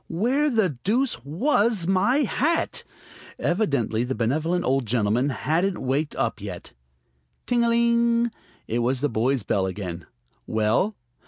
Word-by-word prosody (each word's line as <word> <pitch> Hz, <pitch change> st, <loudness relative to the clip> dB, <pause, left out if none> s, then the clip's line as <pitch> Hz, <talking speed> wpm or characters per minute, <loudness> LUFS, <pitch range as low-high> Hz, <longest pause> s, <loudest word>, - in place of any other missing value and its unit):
Where 255 Hz, -, +1 dB
the 195 Hz, -, 0 dB
deuce 230 Hz, -, 0 dB
was 205 Hz, -, +1 dB
my 205 Hz, -, +2 dB
hat? 310 Hz, +7 st, 0 dB, 0.5 s
Evidently 140 Hz, -, 0 dB
the 130 Hz, +1 st, -3 dB
benevolent 155 Hz, +10 st, 0 dB
old 130 Hz, -2 st, +1 dB
gentleman 115 Hz, +4 st, +1 dB
hadn't 170 Hz, +7 st, 0 dB
waked 140 Hz, +4 st, -1 dB
up -, -, -2 dB
yet. -, -, -8 dB, 0.7 s
Ting 240 Hz, -1 st, +2 dB
a 235 Hz, -, +2 dB
ling! 235 Hz, 0 st, +2 dB, 0.4 s
It 115 Hz, -, -1 dB
was 125 Hz, +2 st, 0 dB
the 145 Hz, -, +1 dB
boy's 120 Hz, +2 st, 0 dB
bell 95 Hz, -1 st, 0 dB
again. 90 Hz, -3 st, -6 dB, 0.4 s
"Well?" 110 Hz, -, +1 dB
160 Hz, 135 wpm, -24 LUFS, -, 0.7 s, my